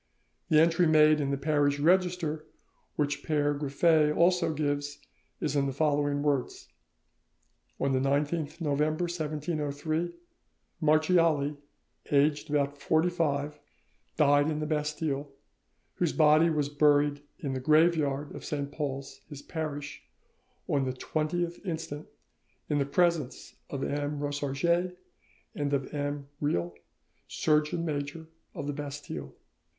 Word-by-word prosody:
The 155 - +6
entry 165 +2 +4
made 155 -1 +5
in 140 - -1
the 140 - 0
parish 145 0 +1
register, 170 -1 +1 0.5
which 145 -1 -1
Pere 145 -2 +1
Griffet 150 +2 +3
also 175 -1 +3
gives, 145 -1 -2 0.4
is 150 -1 -1
in 140 -1 +2
the - - -1
following 145 -1 +1
words:— 140 -4 -1 1.1
"On 135 - +1
the 130 - +2
19th 145 +3 0
November 155 +1 0
1703, 155 0 -2 0.7
Marchiali, 155 -2 +3 0.5
aged 145 +1 +2
about 145 -1 0
forty 160 +4 +2
five, 150 -3 -1 0.6
died 145 +1 +4
in 155 - -1
the 155 - -2
Bastille, 150 -1 -2 0.6
whose 175 -3 0
body 155 +1 +5
was 150 -3 0
buried 145 0 +3 0.2
in 140 -2 -4
the 130 - -2
graveyard 150 -1 +2
of - - -8
Saint 140 -1 -3
Paul's, 135 -2 -5
his 145 -2 -9
parish, 145 -3 -5 0.7
on 140 -2 +1
the 130 - -2
20th 170 +6 -2
instant, 160 -4 -5 0.6
in 145 - +1
the 140 - 0
presence 165 -3 0 0.2
of 135 -1 -4
M. 145 +1 -2
Rosarges 145 +5 0 0.6
and 145 -1 -2
of 135 +1 -4
M. 145 -1 -3
Reilh, 85 - 0 0.6
Surgeon 155 +2 +1
Major 145 +1 -4 0.3
of - - -4
the 145 - -2
Bastille. 145 - -6
150 Hz, 125 wpm, -29 LUFS, 145-160 Hz, 1.1 s, The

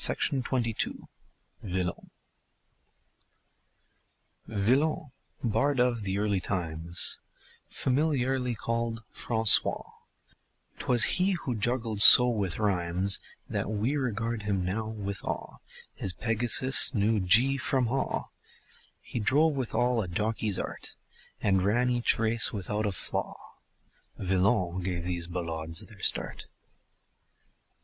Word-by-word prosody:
VILLON 90 -2 -3 2.5
Villon 130 +8 -1 0.3
bard 125 +4 -1
of 125 -2 0
the 95 -1 -4
early 100 -1 -1
times, 85 -2 -2 0.5
Familiarly 130 -3 -1
called 115 0 -4
Francois 110 -2 +4 1.0
'Twas 120 -2 +1
he 190 +1 +1
who 140 -8 -4
juggled 115 -1 -1
so 125 +3 +12
with 105 -7 -3
rhymes 95 -2 0 0.3
That - - -4
we 110 +6 -2
regard 115 -4 -3
him 100 -3 -3
now 105 +4 -4
with 100 -3 -7
awe; - - -6 0.4
His 95 - -3
Pegasus 120 +5 +4
knew 105 +1 0
"Gee" 115 +9 +3
from 130 0 -1
"Haw". 135 +4 -3 0.7
He - - -7
drove 145 +8 +1
with 130 -5 -5
all 120 0 0
a 95 - -6
jockey's 105 +2 -2
art - - -6 0.5
And 95 -2 +1
ran 120 +6 0
each 120 -1 +1
race 115 +1 +1
without 105 +1 -4
a - - -2
flaw 95 - -5 0.8
Villon 95 -1 -1
gave 90 -1 -4
these 85 -1 -4
ballades 85 -2 -4
their - - -17
start. - - -1
110 Hz, 110 wpm, -27 LUFS, 95-125 Hz, 2.5 s, so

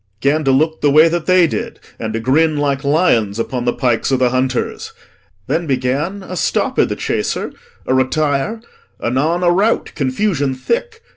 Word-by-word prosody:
gan 145 +5 +1
to 135 - +1
look 155 +4 +1
The 145 - +3
way 155 +3 +6
that 170 -1 -3
they 185 -1 +5
did 160 - -4 0.2
and 110 -1 -3
to 115 - -1
grin 150 +6 +2
like 140 -2 -1
lions 140 - +2
Upon 120 +1 -3
the 120 - +2
pikes 125 -1 0
o' 130 - +3
th' 125 -1 +2
hunters. 130 0 -2 0.5
Then 165 - -1
began 140 +9 -1
A 185 - -7
stop - - 0
i' - - +5
th' - - -4
chaser, - - -2 0.3
a - - 0
retire; 145 - 0 0.4
anon 155 +9 0
A 175 - +4
rout, 205 +6 +1
confusion 140 0 -1
thick. 470 - -3
145 Hz, 175 wpm, -17 LUFS, 130-170 Hz, 0.5 s, way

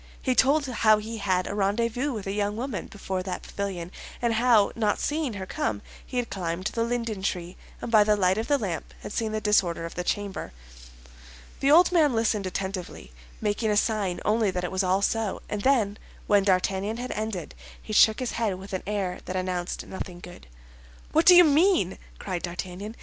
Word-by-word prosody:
He 260 - 0
told 280 +4 +3
how 220 -4 +3
he 220 +2 -6
had 185 -2 +1
a - - -4
rendezvous 230 +7 0
with 215 -6 -5
a 195 - -2
young 205 +1 -1
woman 235 -6 -4
before 190 -2 -4
that 185 0 -5
pavilion, 185 -4 -5 0.3
and 235 -1 +1
how, 225 -3 +4
not 215 -3 +1
seeing 295 -5 -1
her 190 -2 -5
come, 110 - -3 0.2
he 250 - -6
had 245 -1 -2
climbed 175 -1 -3
the 230 +2 0
linden 230 -4 -2
tree, 180 -2 -3 0.3
and 235 - -4
by 215 -2 +7
the 210 0 +3
light 190 0 +2
of 225 - -3
the 290 - +3
lamp 190 - -5
had 205 - -7
seen 225 -2 -1
the 215 - -1
disorder 185 -5 +1
of 165 - -7
the 180 - -3
chamber. 200 - -3 1.1
The 275 - +2
old 340 +5 +6
man 310 -6 +4
listened 215 -3 +1
attentively, 185 - -5 0.3
making 215 +1 0
a 210 - +2
sign 205 -5 0
only 215 -1 +2
that 180 -1 -3
it 180 - -3
was 190 0 0
all 190 +2 +1
so; 225 -1 -1
and 210 - -3
then, 220 -5 +2 0.3
when 205 -1 +3
D'Artagnan 195 +3 +1
had 250 +1 -5
ended, 215 -6 -4 0.3
he 215 - -8
shook 215 +1 +6
his 255 -2 -2
head 220 -5 -1
with 195 +1 -10
an 185 - -2
air 195 -3 -2
that 185 - -5
announced 185 -1 -3
nothing 180 -2 -7
good. 175 - -12 0.6
"What 320 +2 +3
do 360 - +10
you 355 - +10
mean?" 310 - +3 0.2
cried 180 -3 -4
D'Artagnan. 185 +4 -6
205 Hz, 200 wpm, -26 LUFS, 185-230 Hz, 1.1 s, do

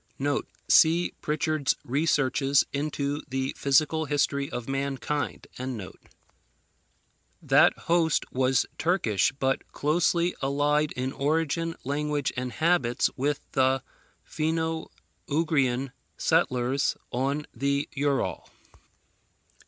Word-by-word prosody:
[See 170 +2 +5
Prichard's 155 -2 0
Researches 140 0 +2
into 145 0 -2
the 135 0 -2
Physical 155 +3 +2
History 140 -1 0
of 120 -2 -5
Mankind.] 140 +1 -2 1.9
That - - +5
host 165 -2 +1
was 130 0 +2
Turkish; 145 - +2
but 135 0 -2
closely 170 +3 +1
allied 145 +2 +1
in 130 +1 -2
origin, 165 +3 0
language, 145 +1 -1
and 125 0 -3
habits, 145 -5 +1
with 145 +2 -1
the 130 -1 +2 0.4
Finno 160 +1 -1 0.4
Ugrian 140 -4 +1 0.3
settlers 130 +2 +1
on 140 +4 -1
the 140 +3 0
Ural. 140 -1 -1
140 Hz, 90 wpm, -27 LUFS, 135-155 Hz, 1.9 s, See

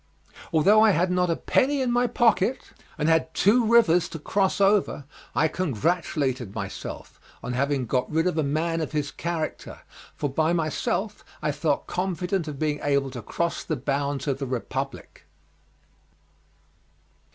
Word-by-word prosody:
Although 195 +7 +5
I 220 - +6
had 180 +2 +1
not 180 -1 +1
a 165 - +2
penny 280 - +1
in 255 -2 0
my 245 +1 +2
pocket 235 0 +1 0.3
and 150 -1 0
had 160 0 +2
two 230 +5 +4
rivers 205 -7 +4
to - - -6
cross 190 +6 0
over, 195 -7 +2 0.3
I 160 - +3
congratulated 140 - -1
myself 100 -2 -7 0.2
on 125 - -3
having 140 0 0
got 125 +2 -1
rid 160 +2 +1
of 180 - +1
a 160 - +1
man 165 +4 -1
of 155 - -4
his 145 -1 -1
character, 170 -2 -4 0.3
for 145 - -2
by 155 +4 +1
myself 175 +5 -2 0.2
I 150 - +1
felt 145 0 -1
confident 180 -1 -2
of 150 -2 -5
being 150 0 -1
able 140 -2 +1
to 125 -2 -6
cross 170 +10 -2
the 155 - -2
bounds 140 +2 -2
of 140 -2 -1
the 135 - -3
Republic. 130 - -5
160 Hz, 155 wpm, -25 LUFS, 140-185 Hz, 0.3 s, I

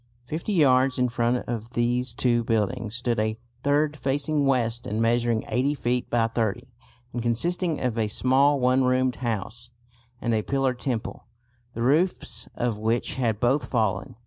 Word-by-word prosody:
Fifty 160 - -4
yards 130 -5 +4
in 125 -1 +2
front 120 +1 0
of 115 0 -5
these 120 0 0
two 120 -2 +2
buildings 115 0 -1
stood 120 -2 0
a 110 0 -1 0.2
third 145 +1 +1
facing 145 +1 0
west 120 -3 0
and 105 +2 -2
measuring 115 0 +1
80 130 +5 0
feet 125 -2 -1
by 120 -1 +2
30 115 +1 -2 0.5
and 120 - -2
consisting 165 +8 0
of 120 -3 -1
a 110 - +1
small 135 +6 +3
one 130 +1 +3
roomed 130 0 +1
house 115 0 -4 0.5
and 120 -2 -1
a 110 - +2
pillared 135 +1 -1
temple, 120 -3 -4 0.5
the 115 - -2
roofs 155 +9 +1
of 120 -3 -1
which 115 +4 -1
had 115 -5 0
both 130 +5 +2
fallen. 110 -6 -1
120 Hz, 160 wpm, -25 LUFS, 115-130 Hz, 0.5 s, yards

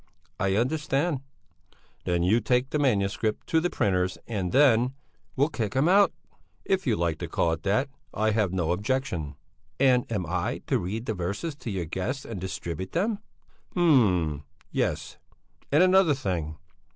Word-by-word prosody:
"I 95 0 +1
understand." 145 +4 0 0.8
"Then 85 -1 +1
you 105 +6 +4
take 125 +4 +1
the 150 - 0
manuscript 105 -5 0
to 160 - +4
the 175 +2 0
printers' 95 - 0
and 95 -6 -3
then...." 130 -2 +4 0.4
"We'll 140 +3 +2
kick 110 -8 -3
him 135 +5 +3
out!" 200 +3 +5 0.5
"If 190 -4 0
you 115 - +3
like 85 -4 -1
to - - -4
call 85 - +1
it 80 - -5
that, 105 +8 +1 0.2
I 110 0 +1
have 105 -4 +1
no 90 -3 0
objection." 90 - -2 0.4
"And 125 -3 +3
am 100 -5 -1
I 85 +2 -2
to - - +1
read 110 +6 -4
the 110 - -1
verses 100 - -3
to 120 - -6
your 95 -4 -2
guests 95 - -3
and 105 -6 -6
distribute 90 0 -5
them?" 200 +5 0 0.6
"Hm 95 - +3 0.3
yes! - - -2 0.5
And 150 +5 +5
another 185 -4 +5
thing! 85 - -3
110 Hz, 160 wpm, -27 LUFS, 90-135 Hz, 0.8 s, out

